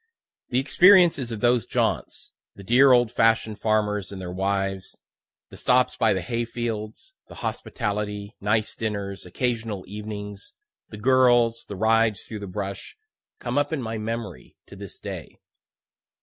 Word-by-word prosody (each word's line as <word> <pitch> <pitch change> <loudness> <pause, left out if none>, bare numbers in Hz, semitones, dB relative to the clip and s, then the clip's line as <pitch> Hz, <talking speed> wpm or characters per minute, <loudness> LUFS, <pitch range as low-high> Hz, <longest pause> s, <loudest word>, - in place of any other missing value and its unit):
The 125 - 0
experiences 160 -1 +5
of 110 -2 -5
those 120 -3 +2
jaunts, - - -1 0.2
the 100 - -11
dear 130 +7 +5
old 120 -2 +4
fashion'd 115 -2 +2
farmers 105 -3 0
and 100 - -7
their 90 -1 -6
wives, 95 0 -2 0.5
the - - -10
stops 125 0 +2
by 110 - +3
the 95 - 0
hay 115 +5 -2
fields, 115 - -5
the - - -12
hospitality, 105 -1 -4
nice 110 +2 0
dinners, 100 -4 -4
occasional 110 -1 -2
evenings, 105 0 -7 0.4
the 105 - -9
girls, 120 -1 +3
the 100 - -6
rides 110 0 +2
through 110 - -7
the 100 - -7
brush, 100 - -6 0.4
come 125 +3 -1
up 145 +1 -1
in 160 - -1
my 110 -3 -4
memory 110 -4 -5
to - - -13
this - - -9
day. - - -8
110 Hz, 150 wpm, -25 LUFS, 100-120 Hz, 0.5 s, experiences